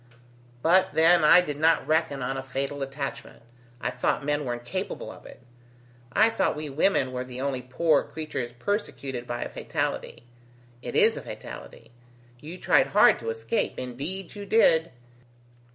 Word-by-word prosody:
But 185 +3 +3
then 165 +1 +5
I 165 +4 +8
did 150 -4 -5
not 165 +1 +3
reckon 155 -4 0
on 135 +2 -2
a 135 - -3
fatal 135 +2 -4
attachment, 135 -2 -6 0.4
I 125 - -2
thought 125 +2 -1
men 145 0 0
were 120 - -1
incapable 120 0 -5
of - - -13
it. - - -14 0.7
I 220 - +4
thought - - 0
we 150 -1 -5
women 135 -3 +2
were 125 0 -3
the 125 0 -8
only 135 -1 -2
poor 140 +6 +2
creatures 155 -6 -5
persecuted 135 - -4
by 120 - -3
a - - -6
fatality. - - -4 0.6
It - - -6
is - - +4
a - - -5
fatality! - - -10 0.5
You 160 +6 -9
tried 135 -6 +3
hard 135 - +5
to 115 - -5
escape, 115 +1 -2
indeed 145 +10 -4
you 205 -1 -8
did. 165 -7 +4
140 Hz, 160 wpm, -26 LUFS, 125-165 Hz, 0.7 s, I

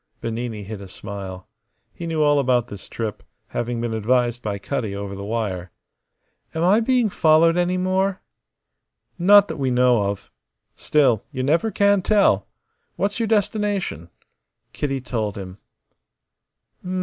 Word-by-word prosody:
Bernini 115 -2 -4
hid 100 0 -7
a 100 - -9
smile. 95 -1 -8 0.5
He 170 - -6
knew 160 -2 +1
all 145 -1 +4
about 125 -3 +1
this 100 -2 -10
trip, 110 -3 -4 0.3
having 120 0 -3
been 115 -1 -2
advised 120 +2 +1
by 105 -3 -3
Cutty 105 -1 -3
over 100 0 -5
the 100 0 -7
wire. 100 -5 -3 0.9
"Am 160 - 0
I 195 +5 +5
being 245 0 +2
followed 165 -3 +4
any 180 +1 +1
more?" 190 +1 0 1.0
"Not 205 +3 +7
that - - -5
we 135 -2 0
know 125 -4 +3
of. 100 - -6 0.4
Still, 130 -8 +2
you 130 -3 -3
never 165 +11 +2
can 200 -1 +3
tell. 195 - +3 0.5
What's 200 +4 -1
your 230 - 0
destination?" 205 - -1 0.6
Kitty 135 -2 -2
told 110 -5 -3
him. 95 -1 -8
125 Hz, 140 wpm, -22 LUFS, -, 1.0 s, Not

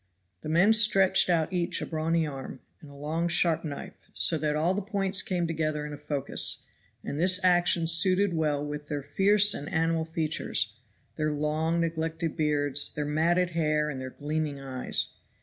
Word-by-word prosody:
The 155 - -6
men 175 +7 +4
stretched 195 -4 +4
out 165 0 +1
each 175 0 -1
a - - -4
brawny 160 0 -1
arm, 135 -3 -7 0.2
and 150 - -13
a 140 - -14
long 155 +4 -2
sharp 170 -1 +2
knife, 145 -3 -8
so 165 - +3
that 150 0 -1
all 165 +4 +1
the 205 - -2
points 195 -1 0
came 180 -2 -2
together 155 -2 -2
in 150 - -7
a - - -7
focus; 145 -2 0 0.4
and 145 - -5
this 180 +2 +5
action 175 -2 +3
suited 185 +4 +4
well 150 -3 -1
with 150 0 -6
their 145 -1 -4
fierce 200 +7 +4
and 145 - -6
animal 165 0 0
features, 155 -9 -1 0.4
their 155 -1 0
long 155 +3 -1
neglected 160 0 -2
beards, 145 -3 +1
their 150 - -2
matted 170 +4 +1
hair 150 -2 0
and 130 -2 -6
their 130 - -5
gleaming 150 +1 -4
eyes. 130 -2 -2
160 Hz, 175 wpm, -27 LUFS, 150-175 Hz, 0.4 s, this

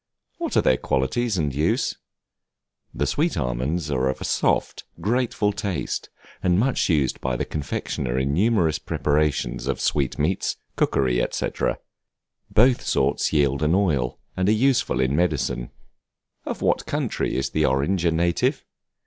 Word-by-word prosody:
What - - -1
are - - +4
their 65 - +4
qualities 115 - 0
and 75 -5 0
use? 75 +4 +1 1.0
The 75 - -1
sweet 155 - 0
almonds 75 +5 -1
are 65 -1 +1
of 65 - -3
a - - -6
soft, - - 0 0.2
grateful 105 +1 0
taste, 100 -3 -3 0.3
and 90 -1 +2
much 125 -1 +1
used 75 -6 +1
by 65 -1 -1
the - - -2
confectioner 65 -4 -3
in 65 +2 0
numerous 90 -4 +2
preparations 75 0 0
of - - -1
sweet 70 -4 0
meats, 80 +6 0 0.2
cookery, 60 -2 +1
&c. - - -2 1.0
Both 125 +3 +4
sorts 70 +2 +1
yield 70 -2 +2
an 75 +3 +3
oil, 75 -11 +1 0.2
and 95 +2 +1
are - - +5
useful 130 - +2
in 65 +2 +1
medicine. 75 -7 0 0.8
Of - - -4
what - - +1
country - - -1
is 65 0 -1
the 80 -1 +2
Orange 70 +8 +1
a 85 - +4
native? 85 +1 +1
75 Hz, 150 wpm, -24 LUFS, 65-95 Hz, 1.0 s, are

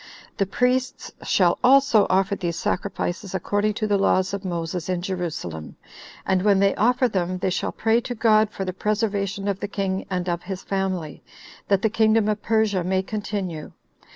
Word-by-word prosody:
The 195 - +1
priests 250 +5 0
shall 175 -3 +2
also 265 -4 +5
offer 195 +2 +2
these 170 -3 -3
sacrifices 190 +2 -3
according 205 +2 0
to 215 - -1
the 205 -2 +1
laws 190 -1 +2
of 200 0 -4
Moses 170 -1 -3
in 180 -1 -1
Jerusalem; 165 - -5 0.5
and 190 -1 +2
when 200 0 +4
they 195 0 +3
offer 250 +3 +2
them, 185 -4 -2
they 185 0 -1
shall - - -1
pray 225 +1 +1
to 245 0 -5
God 215 -2 +4
for 195 -2 -5
the 185 - -3
preservation 205 -1 -1
of 200 -1 -1
the 205 - -3
king 195 -1 -3
and 180 -1 -2
of 175 -1 -1
his 190 -2 -6
family, 190 -5 -3 0.5
that 195 -1 +2
the 220 - +3
kingdom 220 -1 +3
of 210 0 -1
Persia 220 -4 +1
may 185 +1 0
continue. 195 -6 -4
195 Hz, 180 wpm, -23 LUFS, 185-215 Hz, 0.5 s, also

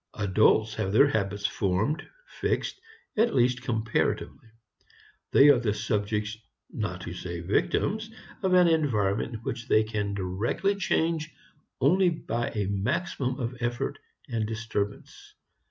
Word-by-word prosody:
Adults 110 +1 +3
have 95 - -2
their 110 +7 +6
habits 100 -3 -1
formed, 110 - 0 0.2
fixed, - - -2 0.3
at 225 +2 +2
least 125 -1 +3
comparatively. 115 -2 -1 0.8
They 140 +2 +7
are 140 -4 +6
the 110 -4 0
subjects, 105 0 -1 0.4
not - - -4
to - - -6
say 85 -1 -5
victims, 210 - 0 0.3
of 190 -2 +2
an 180 -1 +6
environment 115 -8 0
which 115 - -4
they 110 - +4
can 105 -2 -2
directly 100 - 0
change 160 -4 0 0.5
only 185 0 +4
by 120 -8 -2
a 105 -3 -2
maximum 125 - -1
of 125 0 -3
effort 120 0 -2 0.3
and 110 -2 -2
disturbance. 110 -2 -5
115 Hz, 125 wpm, -27 LUFS, 105-145 Hz, 0.8 s, They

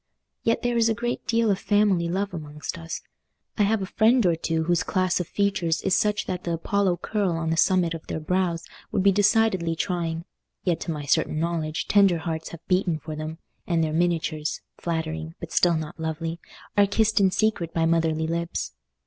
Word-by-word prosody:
Yet 230 - +1
there 245 -1 +1
is 230 0 +4
a 225 - +1
great 240 +1 -3
deal 230 -2 +3
of 195 - 0
family 205 -5 +2
love 195 +3 -1
amongst 150 -1 -6
us. 165 0 -5 0.5
I - - 0
have 205 0 +2
a - - -2
friend 225 +4 +3
or 170 -2 +4
two 160 0 -1
whose 175 +1 +2
class 185 -1 +1
of 180 - -3
features 195 -5 0
is 190 - +3
such 210 -1 +1
that 180 -1 -4
the 170 - -2
Apollo 185 +2 +1
curl 205 -5 0
on 165 -1 -1
the - - +2
summit 175 -1 +3
of 165 - -8
their - - -3
brows 170 0 0 0.3
would 195 - +1
be 200 - +6
decidedly 200 -4 +3
trying; 165 -1 -2 0.4
yet 170 -3 +1
to 170 - -3
my 150 -2 -4
certain 155 +2 +1
knowledge 160 -2 -2
tender 195 -4 +5
hearts 160 -1 -4
have 170 0 -11
beaten 180 -3 +2
for 155 0 -7
them, 155 +1 -5 0.3
and 165 -2 +2
their 155 -1 -1
miniatures—flattering, 160 0 -2
but 170 - -8
still 175 -2 +3
not 160 +2 -6
lovely—are 165 +5 -2
kissed 220 +2 +2
in 195 -1 +5
secret 185 -4 0
by 165 -1 +1
motherly 165 -1 +1
lips. 170 +1 -3
170 Hz, 190 wpm, -25 LUFS, 160-200 Hz, 0.5 s, be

